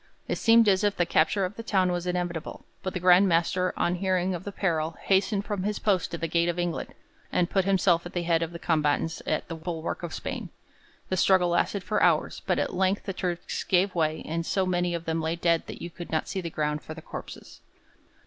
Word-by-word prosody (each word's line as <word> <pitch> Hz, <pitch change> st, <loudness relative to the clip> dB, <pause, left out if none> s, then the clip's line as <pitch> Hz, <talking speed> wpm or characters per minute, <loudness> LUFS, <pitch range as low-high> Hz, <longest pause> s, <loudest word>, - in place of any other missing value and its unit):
It -, -, -2 dB
seemed 230 Hz, -1 st, +6 dB
as 190 Hz, 0 st, +4 dB
if 205 Hz, -1 st, +1 dB
the 175 Hz, -, +2 dB
capture 170 Hz, +4 st, +2 dB
of 185 Hz, +2 st, -6 dB
the -, -, -4 dB
town 190 Hz, -5 st, +1 dB
was 175 Hz, 0 st, -2 dB
inevitable, 175 Hz, -2 st, -3 dB, 0.2 s
but 185 Hz, -, -4 dB
the -, -, -1 dB
Grand 180 Hz, +2 st, +6 dB
Master 180 Hz, +1 st, +2 dB
on 175 Hz, -, +1 dB
hearing 185 Hz, 0 st, 0 dB
of 175 Hz, 0 st, -6 dB
the 200 Hz, -, -4 dB
peril 165 Hz, -5 st, -1 dB
hastened 195 Hz, +1 st, +2 dB
from 205 Hz, -3 st, -2 dB
his 205 Hz, +2 st, -1 dB
post 190 Hz, -6 st, +1 dB
at -, -, -8 dB
the 165 Hz, -, 0 dB
gate 170 Hz, +1 st, +1 dB
of 175 Hz, -, -2 dB
England, 175 Hz, -1 st, -3 dB, 0.4 s
and 175 Hz, -1 st, +1 dB
put 195 Hz, -2 st, +2 dB
himself 185 Hz, -3 st, +3 dB
at -, -, -13 dB
the 175 Hz, -, -1 dB
head 170 Hz, -1 st, +2 dB
of 165 Hz, 0 st, -2 dB
the 170 Hz, -, -6 dB
combatants 160 Hz, -1 st, 0 dB
at -, -, -1 dB
the -, -, -5 dB
bulwark 165 Hz, +1 st, -4 dB
of 170 Hz, -2 st, -5 dB
Spain. -, -, -5 dB, 0.6 s
The 185 Hz, -, 0 dB
struggle 185 Hz, -1 st, +4 dB
lasted 180 Hz, +3 st, 0 dB
for 215 Hz, -, 0 dB
hours, 165 Hz, -3 st, +2 dB
but 180 Hz, -, +2 dB
at -, -, -1 dB
length 190 Hz, +2 st, +1 dB
the 195 Hz, -, -4 dB
Turks 180 Hz, -2 st, -3 dB
gave 185 Hz, +1 st, +2 dB
way, 155 Hz, -2 st, 0 dB
and 165 Hz, +1 st, -2 dB
so 190 Hz, +3 st, 0 dB
many 175 Hz, -1 st, 0 dB
of 170 Hz, 0 st, -5 dB
them 165 Hz, 0 st, -1 dB
lay 160 Hz, +1 st, -1 dB
dead 170 Hz, -1 st, +1 dB
that -, -, -8 dB
you 170 Hz, -, -6 dB
could 175 Hz, +1 st, -9 dB
not 160 Hz, -, 0 dB
see 190 Hz, -, -3 dB
the 170 Hz, -, -4 dB
ground 150 Hz, -1 st, -2 dB
for 155 Hz, -, -8 dB
the 160 Hz, -, -10 dB
corpses. -, -, -9 dB
175 Hz, 235 wpm, -27 LUFS, 165-190 Hz, 0.6 s, seemed